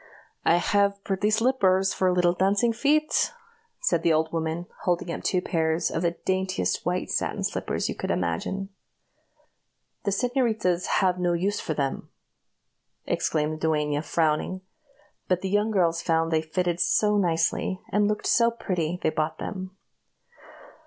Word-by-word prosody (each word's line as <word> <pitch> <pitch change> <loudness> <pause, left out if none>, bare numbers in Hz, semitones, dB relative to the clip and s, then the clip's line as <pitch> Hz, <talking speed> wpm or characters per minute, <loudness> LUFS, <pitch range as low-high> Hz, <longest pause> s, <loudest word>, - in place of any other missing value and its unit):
"I 170 - +4
have 200 +3 +1
pretty 195 +2 0
slippers 215 -5 +2
for 185 -1 +2
little 175 -1 +3
dancing 200 +5 +2
feet," 300 +6 +2 0.5
said - - +1
the 170 - +3
old 160 +1 0
woman, 165 +1 -2 0.2
holding 175 -1 0
up - - -4
two 180 -1 0
pairs 160 -1 0
of 165 - -2
the 170 -1 0
daintiest 190 0 0
white 180 +1 -2
satin - - -1
slippers - - -2
you - - -2
could - - -5
imagine. 90 - -2 1.3
"The - - 0
señoritas 220 -5 0
have 180 -1 +2
no 175 -1 +1
use 190 +4 0
for 155 - -3
them," 140 -2 -2 1.0
exclaimed 155 0 -1
the 160 - +1
duenna, 150 -2 0
frowning; 160 +3 0 0.7
but 180 -1 +1
the 190 - -2
young 205 +2 +2
girls 170 -5 +1
found 165 0 +1
that - - +2
they - - +1
fitted 175 +1 -1
so 210 +3 +3
nicely, 175 +1 0
and 210 +1 +3
looked 210 0 -2
so 235 -1 +4
pretty, 180 -7 -2
they 160 - +2
bought 155 0 -2
them. 190 -1 -6
180 Hz, 150 wpm, -26 LUFS, 165-200 Hz, 1.3 s, I